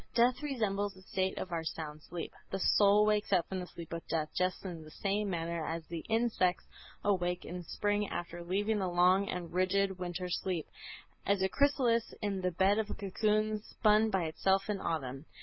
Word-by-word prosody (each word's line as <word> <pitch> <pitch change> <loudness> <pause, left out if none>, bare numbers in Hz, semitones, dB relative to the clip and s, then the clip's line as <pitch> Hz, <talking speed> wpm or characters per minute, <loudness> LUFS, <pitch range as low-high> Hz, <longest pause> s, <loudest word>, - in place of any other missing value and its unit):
Death 245 +3 +4
resembles 205 -8 -1
the 185 - -15
state 190 0 -1
of 180 - -4
our 165 -1 -1
sound 155 -1 -5
sleep. 170 +2 -6 0.2
The 195 - -2
soul 205 +2 +5
wakes 210 -1 +1
up 180 -4 +3
from 190 - -3
the 180 - -5
sleep 170 -1 -9
of 165 - -3
death 155 -2 -1
just 185 +2 0
in 175 -4 -5
the 155 - -12
same 200 +5 -1
manner 170 -2 -2
as 165 +1 -3
the 165 -1 -5
insects 220 -5 +2 0.4
awake 180 -3 +1
in 180 +1 -5
spring 205 +4 0
after 175 0 -5
sleeping 205 +5 0
the 190 - 0
long 180 +3 +4
and 175 -2 -4
rigid 190 +1 +1
winter 180 0 -3
sleep, 180 -2 -2 0.6
as 200 -1 +2
a 190 - +2
chrysalis 255 -5 +2
in 200 -3 -2
the 180 - +1
bed 190 +4 +3
of 215 -1 -1
a - - -4
cocoon 215 +2 0
spun 215 +1 +3
by 190 -4 +1
itself 190 +5 +1
in 200 -2 -3
autumn. 135 -3 -3
190 Hz, 195 wpm, -33 LUFS, 175-210 Hz, 0.6 s, soul